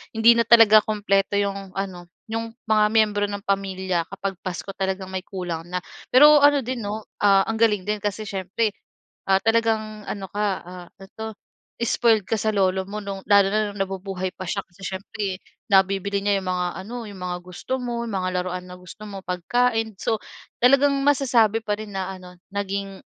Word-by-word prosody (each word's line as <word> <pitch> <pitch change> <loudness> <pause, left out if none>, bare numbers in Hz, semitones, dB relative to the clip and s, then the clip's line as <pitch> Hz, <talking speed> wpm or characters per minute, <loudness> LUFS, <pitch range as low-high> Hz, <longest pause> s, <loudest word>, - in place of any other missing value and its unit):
hindi 230 +1 +6
na 230 - +3
talaga 220 -2 +8
kumpleto, 200 -2 0
'yong 195 -1 -3
ano, 185 -3 -5 0.2
'yong 225 0 -3 0.2
mga 215 -1 +4
miyembro 210 -2 +3
ng 200 0 -6
pamilya 190 -3 0
kapag 195 0 -4
Pasko 185 +1 -5
talagang 190 -1 -2
may 185 0 -4
kulang 180 -5 -5
na. 180 - -1 0.3
Pero 295 +3 +8
ano, 290 0 +6
din 245 -2 -4
'no, 210 +1 -5 0.2
ah, 195 -1 +6
ang 225 - -1
galing 210 -4 +3
din 210 0 -1
kasi 205 +1 -2
siyempre, 200 +3 -1 0.6
ah, 190 - +5
talagang 220 -2 +1
ano 195 -2 -5
ka, 210 +1 -1 0.2
ah, 180 0 -10
ano 195 - -12
'to 220 0 -5 0.5
spoiled 230 -2 +3
ka 225 - +1
sa 215 +1 +1
lolo 190 -1 +1
mo 210 +1 -4
no'ng 195 -1 -6
lalo 200 -1 +6
na 215 -1 0
nabubuhay 190 -1 -3
pa 185 - -7
siya 200 +2 -2
kasi 175 +2 -27
siyempre 195 0 -4 0.3
nabibili 195 +1 +3
niya, 205 -1 +2
'yong 190 - -8
mga 180 -1 0 0.2
ano, 240 +3 -7
'yong 200 -2 -10
mga 180 -1 -3
gusto 180 +8 -4
mo, 240 -1 -3
'yong 220 - -5
mga 185 -1 -1
laruan 180 0 -4
na 180 - -9
gusto 180 +4 -12
mo, 195 -1 -7
pagkain. 225 +5 0
So 225 - 0 0.5
talagang 275 +3 +5
masasabi 240 -6 +3
pa 210 -1 -1
rin 215 -1 -7
na 190 0 -3
ano, 180 -1 -13 0.2
naging 195 -1 -3
200 Hz, 185 wpm, -23 LUFS, 190-220 Hz, 0.6 s, talaga